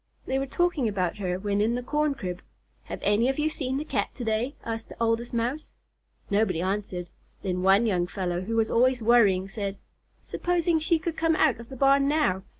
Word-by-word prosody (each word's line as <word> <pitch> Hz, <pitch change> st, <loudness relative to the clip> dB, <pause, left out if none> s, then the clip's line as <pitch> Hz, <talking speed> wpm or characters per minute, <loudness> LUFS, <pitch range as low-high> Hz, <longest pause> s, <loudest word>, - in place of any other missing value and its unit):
They 265 Hz, +1 st, 0 dB
were 270 Hz, -, -2 dB
talking 335 Hz, -4 st, +1 dB
about 190 Hz, -3 st, -1 dB
her 180 Hz, -3 st, -2 dB
when 200 Hz, +1 st, -1 dB
in 225 Hz, +3 st, +2 dB
the 245 Hz, -, -3 dB
corn 300 Hz, +2 st, 0 dB
crib. 180 Hz, -7 st, -5 dB, 0.4 s
"Have -, -, -7 dB
any 210 Hz, +5 st, +3 dB
of 270 Hz, -, -1 dB
you 305 Hz, +1 st, +1 dB
seen 265 Hz, -4 st, -3 dB
the 300 Hz, -, -3 dB
Cat -, -, -1 dB
to 250 Hz, -, -5 dB
day?" 225 Hz, +5 st, -1 dB
asked 225 Hz, -1 st, -5 dB
the -, -, -11 dB
Oldest 230 Hz, +1 st, 0 dB
Mouse. 245 Hz, +6 st, -2 dB, 0.6 s
Nobody 200 Hz, -4 st, +2 dB
answered. 185 Hz, -1 st, -2 dB, 0.4 s
Then 180 Hz, -2 st, -1 dB
one 195 Hz, +4 st, +4 dB
young 180 Hz, -5 st, +1 dB
fellow, 180 Hz, -2 st, -2 dB
who 225 Hz, +5 st, -3 dB
was 225 Hz, -1 st, +1 dB
always 250 Hz, 0 st, +3 dB
worrying, 205 Hz, -5 st, +4 dB
said: 200 Hz, -1 st, -4 dB, 0.4 s
"Supposing 345 Hz, -2 st, 0 dB
she 320 Hz, +1 st, +2 dB
should 330 Hz, 0 st, -3 dB
come 325 Hz, 0 st, +2 dB
out 295 Hz, -8 st, +3 dB
of 235 Hz, -, -11 dB
the 265 Hz, -, -8 dB
barn 275 Hz, +1 st, +4 dB
now! 290 Hz, -11 st, +1 dB
230 Hz, 205 wpm, -26 LUFS, 195-275 Hz, 0.6 s, one